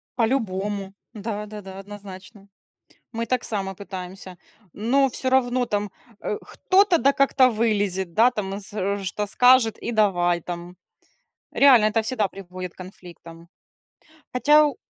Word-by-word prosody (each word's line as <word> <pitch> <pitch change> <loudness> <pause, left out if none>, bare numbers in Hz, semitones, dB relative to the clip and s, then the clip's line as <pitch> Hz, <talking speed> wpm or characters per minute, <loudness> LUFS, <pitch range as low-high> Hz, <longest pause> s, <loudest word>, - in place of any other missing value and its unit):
По-любому. 205 -5 -1 0.2
Да-да-да, 210 -3 -6
однозначно. 195 0 -11 0.7
Мы 230 +1 -3
так 255 +2 -1
само 195 -3 -3
пытаемся, 185 -1 -9 0.4
но 270 +6 +2
всё 260 +1 -3
равно 250 -1 +2
там, 205 -2 -2 0.3
а, 425 - -3
кто-то 380 -4 +2
да 275 -1 +3
как-то 270 -2 +4
вылезет, 205 -4 0
да, 230 +7 +5
там 200 -3 -4
с 195 - -9 0.4
что-то 205 +3 -3
скажет 245 -3 +4
и 235 - -3
давай 175 -5 +2
там. 175 +1 -7 0.8
Реально, 250 -6 +6
это 220 +1 +1
всегда 220 -3 -1
приводит 185 -2 -8
к - - -34
конфликтам. 170 -2 -13 0.9
Хотя 295 +4 +5
у 285 - -3
210 Hz, 130 wpm, -23 LUFS, 190-245 Hz, 0.9 s, Реально